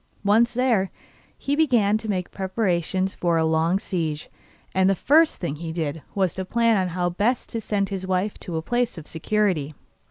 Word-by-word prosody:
Once 230 +4 +3
there, 235 -7 +2 0.5
he 280 - -1
began 240 -10 +3
to 220 0 -3
make 185 -3 -2
preparations 190 -1 -1
for 170 -2 0
a 160 - +2
long 160 +3 +2
siege, 160 -6 -3 0.4
and 190 0 +3
the 195 - +3
first 310 - +4
thing 155 -5 -4
he 165 +1 -5
did 160 -2 -3
was 190 -3 +1
to 190 - -4
plan 225 -2 +2
how 175 0 -1
best 205 +8 0
to 230 - -3
send 200 -2 -1
his 190 -2 -4
wife 190 +2 0
to 170 -3 -4
a 160 - -3
place 240 +1 0
of 160 - -8
security. 165 -4 -1
190 Hz, 185 wpm, -24 LUFS, 170-220 Hz, 0.5 s, first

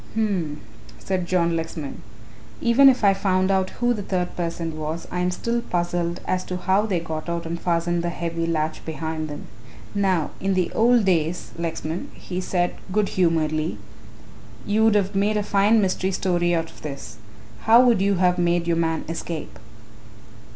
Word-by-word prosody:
"H'm," 190 -9 -1 0.4
said 185 -2 -2
John 170 -2 +2
Lexman. 160 -3 -5 0.6
"Even 255 +4 +6
if 255 -4 +1
I 200 -1 +6
found 190 -1 +1
who 195 +6 +1
the 210 - -4
third 180 -2 -2
person 165 -2 -3
was, 155 +2 -4
I 180 - -2
am 180 0 +1
still 235 +6 -1
puzzled 175 -2 -2
as 185 0 0
to 180 - -4
how 190 +4 +1
they 185 -5 0
got 160 0 -5
out 170 0 -2
and 170 +1 -4
fastened 170 0 0
the 175 - 0
heavy 170 -1 -3
latch 155 -1 -1
behind 160 0 -4
them. 145 - -7 0.5
Now 190 -6 +1
in 195 0 0
the 185 -2 +1
old 235 -1 +4
days, 175 -2 0
Lexman," 165 0 -4
he 180 0 -5
said 180 -1 0 0.2
good 205 +1 +1
humouredly, 160 -3 +1 0.9
"you 215 +2 +2
would 220 -1 +4
have 200 -1 +1
made 205 +2 +1
a 210 - 0
fine 205 +2 +3
mystery 190 -1 0
story 175 -2 +1
out 165 0 -2
of - - -17
this. 135 -7 -7 0.5
How 230 +3 +7
would 235 -6 +4
you 200 0 +3
have 180 -1 +2
made 175 0 +2
your 170 -1 +1
man 165 -1 0
escape?" 165 -1 -5
175 Hz, 170 wpm, -23 LUFS, 165-195 Hz, 0.9 s, How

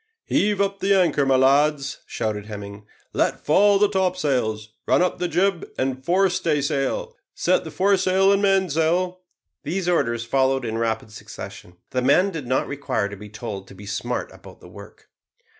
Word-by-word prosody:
"Heave 205 -1 +1
up 200 0 0
the 195 0 +3
anchor, 150 -6 +2
my 135 - +4
lads," 140 +1 +2
shouted 105 -1 -3
Hemming; 100 -1 -8 0.3
"let - - 0
fall 200 +6 +5
the 205 +1 +4
topsails. 145 - -1 0.2
Run - - +4
up 180 - -1
the 180 - 0
jib 175 +2 0
and 130 0 -2
fore 185 +6 +3
staysail. 155 - -1 0.2
Set - - +1
the - - -7
foresail 195 0 +3
and 200 - +1
mainsail." 185 -2 +1 0.4
These 185 0 -3
orders 120 -9 +1
followed 135 +1 +1
in 115 0 -3
rapid 110 -1 -2
succession. 90 -4 -10
The 130 - 0
men 185 +9 +3
did 155 -8 -6
not 130 +1 +1
require 135 -7 -2
to 100 - -8
be 105 +1 -11
told 105 -3 -7
to - - -13
be 100 +2 -11
smart 120 +4 -3
about - - -14
the - - -14
work. - - -14
145 Hz, 170 wpm, -23 LUFS, 115-185 Hz, 0.4 s, fall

